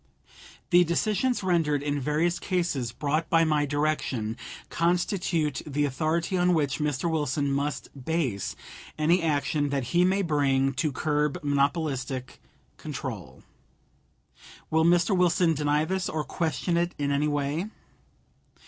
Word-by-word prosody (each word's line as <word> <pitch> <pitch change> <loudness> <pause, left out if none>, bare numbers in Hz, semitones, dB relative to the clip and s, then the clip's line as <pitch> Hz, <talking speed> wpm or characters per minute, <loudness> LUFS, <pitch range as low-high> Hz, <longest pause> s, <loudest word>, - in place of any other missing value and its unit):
The 175 0 +7
decisions 215 +8 0
rendered 160 -6 +1
in 145 0 -1
various 155 +5 0
cases 170 -10 -1
brought 155 +5 -1
by 165 0 +4
my 150 -2 +1
direction 140 -7 -1 0.4
constitute 170 -3 0
the 145 0 -1
authority 160 +6 -1
on 180 0 +3
which 145 -3 0
Mr. 150 +1 -1
Wilson 145 -3 0
must 140 -1 -2
base 130 - -1 0.4
any 165 +4 +3
action 145 -2 0
that 140 -2 -1
he 175 +1 +5
may 190 +2 +2
bring 135 -4 +2
to 140 +3 -1
curb 150 +1 0
monopolistic 140 -3 -1 0.4
control. - - -7 1.3
Will 160 0 +3
Mr. 175 +3 +4
Wilson 180 -1 +3
deny 150 0 +1
this, 185 +2 -2
or 155 -1 -2
question 170 +2 -1
it 175 +1 0
in 140 -1 -1
any 145 +2 +1
way? 145 +5 -1
150 Hz, 130 wpm, -27 LUFS, 140-170 Hz, 1.3 s, The